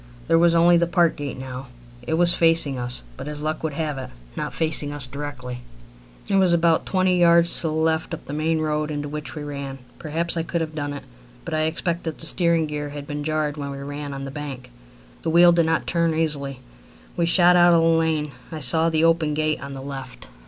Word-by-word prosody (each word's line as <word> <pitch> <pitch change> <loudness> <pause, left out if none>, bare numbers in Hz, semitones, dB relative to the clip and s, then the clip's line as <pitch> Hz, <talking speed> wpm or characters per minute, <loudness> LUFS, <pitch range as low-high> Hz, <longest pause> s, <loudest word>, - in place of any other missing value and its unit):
There 165 0 +4
was 170 0 +4
only 170 +1 +6
the 170 0 +2
park 170 -2 +2
gate 145 -2 -5
now. 130 0 -7 0.3
It 160 +6 -2
was 175 +1 +3
facing 165 -5 +2
us, 125 0 -5
but, 135 - -7
as 150 0 -6
luck 155 0 -2
would 155 -3 -3
have 150 -3 -2
it, 130 - -7 0.3
not - - -3
facing 155 -2 +1
us 145 -2 -2
directly. 125 -2 -6 0.7
It 195 - +2
was 185 -3 +4
about 165 -1 +2
twenty 185 -1 +2
yards 170 0 +5
to 165 - -1
the 155 - -2
left 160 +1 0
up 160 - -15
the 140 - -7
main 155 +1 0
road 150 0 -1
into 145 -1 -3
which 150 +1 -6
we 150 - -5
ran. 140 -2 -6 0.2
Perhaps 165 +2 -2
I - - +1
could 170 +1 -2
have 160 -1 -3
done 145 -2 -3
it, 145 - -7 0.4
but 165 - -5
I 155 0 +1
expect 170 +1 -2
that 160 -2 -4
the - - -1
steering 170 0 +2
gear 150 -1 -4
had 145 0 -7
been 145 0 -5
jarred 155 -1 -1
when 140 -1 -4
we 140 - -6
ran 145 +1 -6
on 135 0 -6
the 135 - -6
bank. 140 - -7 0.5
The - - -2
wheel 175 +2 +7
did 170 -1 +3
not 165 0 0
turn 170 -2 +1
easily. 140 -5 -1 0.5
We 170 -1 +1
shot 175 +1 +5
out 175 -1 +6
of 165 - +4
the - - +4
lane. 160 -2 +1 0.2
I 160 - -5
saw 160 +4 +3
the 160 -1 +1
open 165 -2 +2
gate 155 0 0
on 140 0 -7
the 135 - -7
left. 135 - -8
155 Hz, 230 wpm, -23 LUFS, 145-165 Hz, 0.7 s, wheel